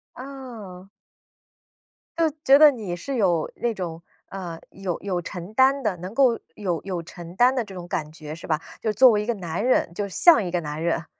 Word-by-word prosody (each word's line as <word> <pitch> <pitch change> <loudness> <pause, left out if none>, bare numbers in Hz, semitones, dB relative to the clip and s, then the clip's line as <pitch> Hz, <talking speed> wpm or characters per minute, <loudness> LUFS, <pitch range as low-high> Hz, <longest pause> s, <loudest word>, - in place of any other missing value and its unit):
哦。 235 -9 -10 1.3
就 325 -2 +2
觉 270 +1 +7
得 300 0 +8
你 205 -8 -5
是 265 +11 -5
有 175 -8 +1
那 240 - 0
种， 170 -4 -5 0.3
呃， 175 -4 -6
有 190 -3 -4
有 185 -3 -2
承 180 +3 -8
担 265 +3 +4
的 210 -4 0
能 185 +5 -8
够 255 -3 +4 0.2
有 180 -6 -2
有 185 -3 -4
承 175 +1 -11
担 245 +4 +5
的 250 - 0
这 200 -3 -11
种 175 -1 -8
感 155 -3 -3
觉， 155 -1 -9
是 170 - -10
吧？ 155 -1 +1 0.2
就 220 - -1
是 - - 0
作 255 +1 +7
为 210 -1 +1
一 - - -4
个 235 - 0
男 175 0 -4
人， 250 -8 +2
就 200 +3 -3
像 310 - +5
一 180 - -3
个 175 0 0
男 150 0 -5
人。 170 -1 0
195 Hz, 225 characters per minute, -24 LUFS, 170-240 Hz, 1.3 s, 得